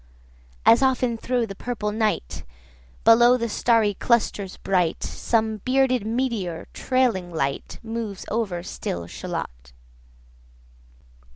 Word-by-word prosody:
95 - - +9
As 235 - +1
often 255 -3 +2
thro' 245 -1 0
the 200 - -7
purple 210 0 -3
night, 215 - -1 0.6
Below 240 +2 +6
the 235 -1 -2
starry 225 -1 +2
clusters 205 -3 0
bright, 180 -4 0
Some 220 -2 0
bearded 255 0 +1
meteor, 225 -8 -2
trailing 245 -9 +1
light, 140 -4 -3
Moves 225 -3 -5
over 200 -6 -1
still 85 - -5
Shalott. - - -6
225 Hz, 110 wpm, -24 LUFS, 190-240 Hz, 0.6 s, 95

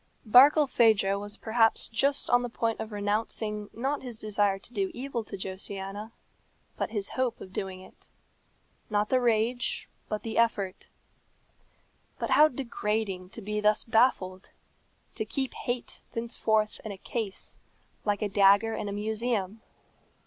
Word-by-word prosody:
Barkilphedro 235 -6 +5
was 205 +1 -4
perhaps 225 0 +2
just 275 +6 +1
on 245 0 +5
the 245 - -3
point 230 -1 -1
of 220 - -5
renouncing 210 0 -1
not 270 +5 -2
his 245 -4 -6
desire 205 -2 +1
to 210 +5 -12
do 195 -3 0
evil 250 -2 -3
to 200 - -7
Josiana, 195 +3 -5 0.6
but - - -2
his 205 -3 0
hope 255 -2 -1
of 185 - -11
doing 190 -1 -4
it; - - -18 0.8
not 210 0 +1
the 255 - +3
rage, 235 +1 0 0.2
but 215 - -3
the 225 0 -1
effort. 200 -5 0 1.3
But - - -3
how 305 - +7
degrading 215 -8 -3
to 225 - -8
be 210 +1 -2
thus 210 0 +4
baffled! 220 -5 +1 0.6
To - - -2
keep 265 +4 -3
hate 245 0 -4
thenceforth 220 -2 0
in 220 - -5
a 195 - -7
case, 210 0 -5 0.4
like 205 0 0
a - - +1
dagger 200 +3 +5
in 205 - -3
a - - -4
museum! 215 -1 -2
215 Hz, 145 wpm, -28 LUFS, 200-235 Hz, 1.3 s, how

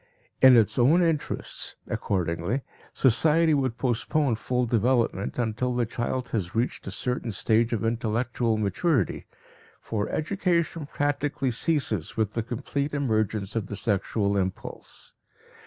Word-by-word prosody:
In 130 -2 +9
its 115 +2 +3
own 155 +9 +5
interests, 160 -3 -2
accordingly, 90 - -1 0.3
society 155 +6 +3
would 130 -5 0
postpone 130 +3 +1
full 125 +2 0
development 115 -3 +1
until 120 +1 -1
the 120 -1 +1
child 120 +2 -3
has 95 -5 -3
reached 120 +3 -1
a - - -3
certain 125 -2 -2
stage 110 +3 +2
of 115 -1 -1
intellectual 115 0 0
maturity, 110 - 0 0.5
for 105 -2 -3
education 170 -3 -1
practically 145 -2 -1
ceases 115 - 0
with 110 -2 0
the 115 - -1
complete 140 +5 -3
emergence 110 -6 -1
of 110 -3 -1
the 105 - -5
sexual 100 -1 0
impulse. 95 -1 -5
120 Hz, 125 wpm, -26 LUFS, 110-140 Hz, 0.5 s, In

